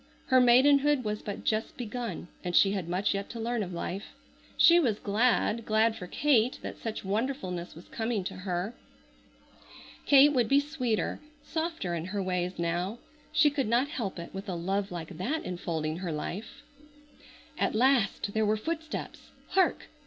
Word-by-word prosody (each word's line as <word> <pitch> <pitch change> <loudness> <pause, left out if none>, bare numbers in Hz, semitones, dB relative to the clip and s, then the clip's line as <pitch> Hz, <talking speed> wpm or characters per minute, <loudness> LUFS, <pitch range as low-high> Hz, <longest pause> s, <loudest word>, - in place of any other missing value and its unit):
Her 260 -1 +6
maidenhood 275 +3 +5
was 210 -1 -3
but 205 - -6
just 215 0 -1
begun 235 -6 -5 0.2
and 175 -1 -2
she 195 - +6
had 190 -4 -3
much 185 +4 +1
yet 200 0 -4
to 235 - -7
learn 235 0 -1
of 185 -3 -4
life. 180 +3 -5 0.4
She 345 +1 +7
was 235 -10 +1
glad, 225 +2 +1
glad 220 +1 +2
for 180 -5 -7
Kate 255 0 +2
that - - -6
such 220 -3 -5
wonderfulness 195 - -2
was 165 - -13
coming 225 -3 -2
to - - -5
her. 185 +3 -3 1.3
Kate 285 +1 +7
would 245 -4 +2
be 275 - +5
sweeter, 265 -7 -1 0.2
softer 320 - -3
in 165 -1 -3
her 195 +1 -3
ways 180 0 -2
now. 175 +5 -1 0.3
She 300 -2 +4
could 275 -5 -1
not 240 +5 +2
help 225 - -4
it 170 0 -8
with 195 +1 -6
a 180 - -2
love 195 +4 -1
like 170 -2 -7
that 295 +12 -2
enfolding 165 -3 -3
her 180 -2 -4
life. 205 - -6 1.0
At - - +1
last 240 -4 +2
there 220 - +1
were 215 +1 +2
footsteps! 320 +6 -5 0.2
Hark! 380 - +2
215 Hz, 165 wpm, -29 LUFS, 185-255 Hz, 1.3 s, She